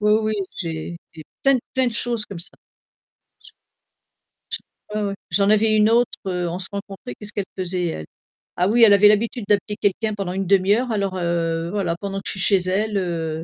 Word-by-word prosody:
Oui 210 0 +3
oui 215 0 -1 0.3
j'ai 165 -1 -4 0.2
j'ai 160 - -9 0.2
plein, 275 -1 +5 0.2
plein 260 -1 +2
de 240 - -1
choses 230 -1 -1
comme 195 - -8
ça. 170 - +2 2.4
J 210 - -6
j - - 0
ouais, 205 - 0
ouais, 200 - -4
j'en 200 0 +3
avais 215 0 +4
une 215 +1 +4
autre, 240 +1 +4 0.2
heu, 180 -2 -1
on 170 - -3
se 185 - -4
rencontrait 195 -9 -7
qu'est-ce 210 +9 -8
qu'elle 205 - -2
faisait 180 -1 -2
elle? 120 - -4 0.5
Ah 180 +1 +2
oui 235 +3 +3
elle 210 -3 +8
avait 200 +1 +7
l'habitude 215 +2 +2
d'appeler 205 0 +1
quelqu'un 210 +2 0
pendant 195 -3 -3
1/2 195 +1 +3
heure 245 +1 -1
alors, 200 -3 -1
heu, 170 -1 -1
voilà 185 -5 -1
pendant 195 -1 -4
que 195 - -12
je - - 0
suis 195 - -4
chez 185 -1 +3
elle, 210 +2 0
heu, 165 -3 -2
200 Hz, 205 wpm, -22 LUFS, 180-215 Hz, 2.4 s, elle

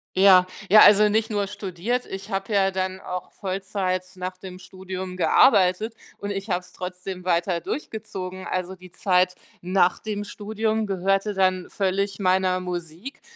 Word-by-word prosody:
Ja, 185 -1 +7 0.2
ja 215 +2 +8
also, 210 +1 +7
nicht 220 +2 +1
nur 205 -2 0
studiert, 205 +4 -3
ich 195 +2 -7
hatte 195 +2 -2
ja 195 -1 +3
dann 185 0 -3
auch 180 -1 -6
Vollzeit 190 -1 -3
nach 185 0 -5
dem 185 -1 -9
Studium 185 0 -7
gearbeitet 185 +2 +4 0.2
und 200 0 -5
ich 195 +1 -5
habe 180 -1 0
es 180 0 -17
trotzdem 180 0 -6
weiter 175 0 +1
durchgezogen. 190 - -6
Also, 185 0 -3
die 185 -1 -15
Zeit 180 -1 +2 0.3
nach 180 0 +2
dem 210 -1 -4
Studium 215 +1 -2
gehörte 195 +2 0
dann 185 -1 +1
völlig 195 0 -1
meiner 185 -1 +2
Musik 180 - -6
190 Hz, 155 wpm, -24 LUFS, 185-205 Hz, 0.3 s, ja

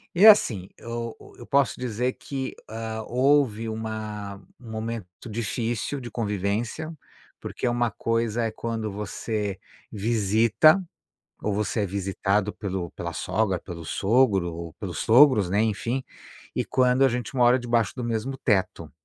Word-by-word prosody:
e, 185 +5 +6
assim, 115 - +6
eu 115 0 -5 0.2
eu 120 - -10
posso 140 0 +2
dizer 125 +1 -1
que, 135 -2 -5
hã, 110 0 -4
houve 125 -3 +2
uma 110 -2 -5 0.2
um 120 -3 -11
momento 110 -2 -6
difícil 115 +4 -2
de 120 -2 -7
convivência, 110 - -2 0.5
porque - - -4
uma 120 -1 +1
coisa 115 +1 0
é 115 - -1
quando 110 -1 -3
você 105 0 -3 0.3
visita 115 - +4 0.6
ou 105 - 0
você 105 +2 -1
é 100 - +1
visitado 100 +2 0
pelo 95 -4 -4
pela 85 -1 -5
sogra, 95 +2 0
pelo 85 -1 -8
sogro 100 -2 +2
ou 85 0 -7
pelos - - -6
sogros, 120 -5 +6
né, 100 +4 +2
enfim, 115 +4 -1 0.5
e - - 0
quando 130 +1 +3
a - - +6
gente 125 -2 -3
mora 125 0 +5
debaixo 120 -3 0
do 125 - -4
mesmo 115 +3 -2
teto. 95 - 0
110 Hz, 140 wpm, -25 LUFS, 100-120 Hz, 0.6 s, e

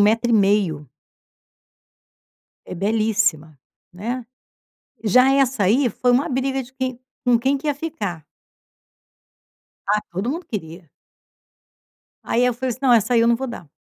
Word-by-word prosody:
metro 225 +3 +3
e - - +2
meio. 195 - +2 1.8
É - - -7
belíssima, 205 -7 0 0.3
né. 235 +7 -4 0.8
Já 255 +6 +5
essa 265 -6 +2
aí, 245 +7 +3
foi 250 +2 0
uma 250 +3 +2
briga 265 +1 -1
de 250 +2 -15
quem 260 -2 -4 0.3
com 245 -2 +4
quem 270 +4 +1
que 275 - -7
ia 290 - +1
ficar. 210 - -5 1.6
Ah, 210 +1 +2
todo 190 +7 -2
mundo 330 +5 -4
queria. 165 -5 -7 1.3
Aí 240 - +1
eu 250 - +2
falei 255 +2 -3
assim: 245 - -5
"Não, 260 -3 +4
essa 225 +1 +3
aí 235 - +5
eu 230 - +3
não 235 - +4
vou 265 +2 -4
dar". 175 - -9
235 Hz, 145 wpm, -21 LUFS, 200-260 Hz, 1.8 s, Já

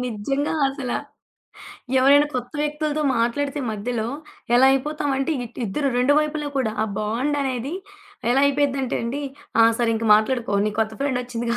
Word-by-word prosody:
నిజంగా 250 +5 -2 0.2
అసలా. 270 -3 -3 1.0
ఎవరైనా 285 +3 +6
కొత్త 245 0 -4
వ్యక్తులతో 300 0 -1
మాట్లాడితే 275 +5 0
మధ్యలో 220 +2 -3 0.5
ఎలా 255 +2 +6
అయిపోతామంటే 275 0 -1
ఇట్ 240 - -13
ఇద్దరు 275 +8 -1
2 250 +3 +3
వైపులా 300 -1 -1
కూడా 255 -5 +1
ఆ - - +2
బాండనేది 260 +4 -1 0.6
ఎలా 265 +3 +4
అయిపోయిద్దంటే 275 -2 0
అండి, 240 +5 -3 0.4
ఆ! - - +8 0.2
సరే 235 - +1
ఇంక 225 +1 -2
మాట్లాడుకో 225 +1 +2
నీ - - 0
కొత్త 220 0 +1
ఫ్రెండొచ్చిందిగా 245 -3 -2
260 Hz, 135 wpm, -23 LUFS, 235-285 Hz, 1.0 s, ఆ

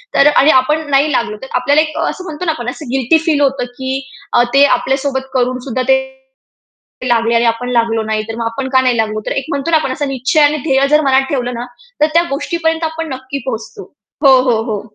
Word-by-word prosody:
तर 275 - +5
अ, 295 - +5
आणि 300 - +5
आपण 300 +5 +1
नाही 280 +2 +3
लागलो 235 -5 -1
तर - - -7
आपल्याला 290 +2 +3
एक 310 0 -4
असं 370 - -3
म्हणतो 320 0 -6
ना, 325 - +2
आपण 245 -6 -4
असं 265 +1 -8
गिल्टी 265 +4 +3
फील 300 -3 +2
होतं 270 -3 +1
की 265 0 -3 0.5
ते 275 - +6
आपल्यासोबत 265 0 -2
करून 255 0 0
सुद्धा 255 0 -2
ते 265 - +5 1.1
लागले 230 -1 +2
आणि 230 +1 +3
आपण 230 +2 -1
लागलो 230 -2 +1
नाही 215 0 -2
तर 225 - -5
मग 230 - -3
आपण 260 +4 -3
का 260 - +5
नाही 250 -2 +1
लागलो. 215 -1 -1
तर - - -2
एक 270 - -2
म्हणतो 280 +1 -2
ना, 320 - +5
आपण 305 - -2
असं 290 +1 -3
निश्चय 270 +3 0
आणि 295 +1 +4
ध्येय 275 -2 +2
जर 300 +1 +4
मनात 265 0 +4
ठेवलं 250 -3 -2
ना, 240 +1 -5 0.4
तर 300 - +5
त्या 335 +1 +4
गोष्टीपर्यंत 325 +3 -2
आपण 320 0 -3
नक्की 260 +2 -6
पोहोचतो. 260 - -6 0.3
हो, 265 -1 +7
हो, 225 -2 +2
हो. 205 -2 -2
265 Hz, 225 wpm, -15 LUFS, 245-300 Hz, 1.1 s, हो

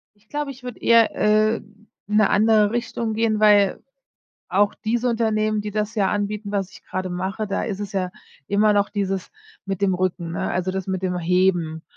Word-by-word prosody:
Ich 210 +1 -32
glaube, 295 -1 -3
ich 260 -1 -11
würde 250 -2 -7
eher, 230 -1 +4
äh, 215 +1 +3
in 210 +1 -17 0.3
'ne 215 -1 +4
andere 215 0 +4
Richtung 230 -1 -2
gehen, 220 -1 +1
weil 205 -2 +4 0.7
auch 205 +2 +2
diese 235 +3 -1
Unternehmen, 215 -2 +1
die 210 0 -5
das 210 +1 -2
ja 200 -4 +1
anbieten, 205 0 -2
was 195 -2 -2
ich - - -14
gerade 185 0 -4
mache, 190 +4 -3
da 200 - -2
ist 205 -4 -3
es 205 -1 -6
ja 185 -2 -1 0.4
immer 210 +1 +3
noch 205 -1 +2
dieses 195 -2 -3 0.3
mit 195 -1 -4
dem 195 -2 +2
Rücken 180 -2 -2
ne, - - -2
also 185 0 -1
das 190 -1 -4
mit 190 -1 -2
dem 180 -1 -1
Heben 175 -2 +1
205 Hz, 195 wpm, -22 LUFS, 190-215 Hz, 0.7 s, eher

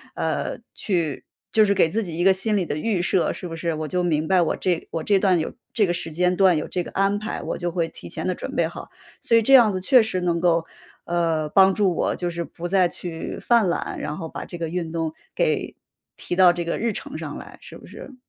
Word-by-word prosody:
呃， - - -2 0.2
去 170 -8 -2 0.3
就 220 - +5
是 200 -1 +3
给 165 - +4
自 220 +7 -1
己 170 -4 -6
一 175 - 0
个 195 +1 +6
心 210 +3 0
理 185 - 0
的 145 - -3
预 195 +2 0
设， 185 -1 +1
是 180 - -7
不 165 - -6
是？ 165 +1 -2
我 155 0 -4
就 180 +4 -1
明 160 -3 0
白 185 0 +4
我 165 - +1
这 180 -3 -1
我 160 - -3
这 200 +2 +3
段 185 -3 +3
有 160 - -3 0.2
这 215 - +3
个 175 - 0
时 175 -1 -3
间 180 +3 +1
段 185 -3 +4
有 155 - -3
这 180 - -2
个 - - -9
安 195 +1 +1
排， 215 - -5
我 - - -3
就 175 -1 -2
会 165 -1 -1
提 - - -11
前 - - -5
地 - - +1
准 - - -6
备 - - +2
好。 - - -9 0.3
所 230 - +3
以 - - +5
这 270 - +3
样 240 -5 +8
子 185 - -2
确 255 +5 +6
实 215 -4 -1
能 170 -1 0
够， 170 -1 +2 0.4
呃， 165 -3 0
帮 190 +3 +5
助 190 -3 +2
我 - - 0
就 175 - -2
是 170 0 -3
不 170 +2 -7
再 185 -1 +3
去 170 -2 -6
犯 230 -6 +3
懒， 170 - -3
然 150 +1 -4
后 165 -4 -5
把 - - -7
这 175 - -8
个 165 -1 -3
运 170 -1 -3
动 165 -1 -2 0.2
给， - - 0 0.4
提 175 - -4
到 180 -1 +7
这 175 0 -3
个 170 - -2
日 230 -2 0
程 - - -6
上 - - -6
来， - - -11
是 - - -11
不 - - -15
是？ 270 - -11
175 Hz, 280 characters per minute, -23 LUFS, 165-195 Hz, 0.4 s, 样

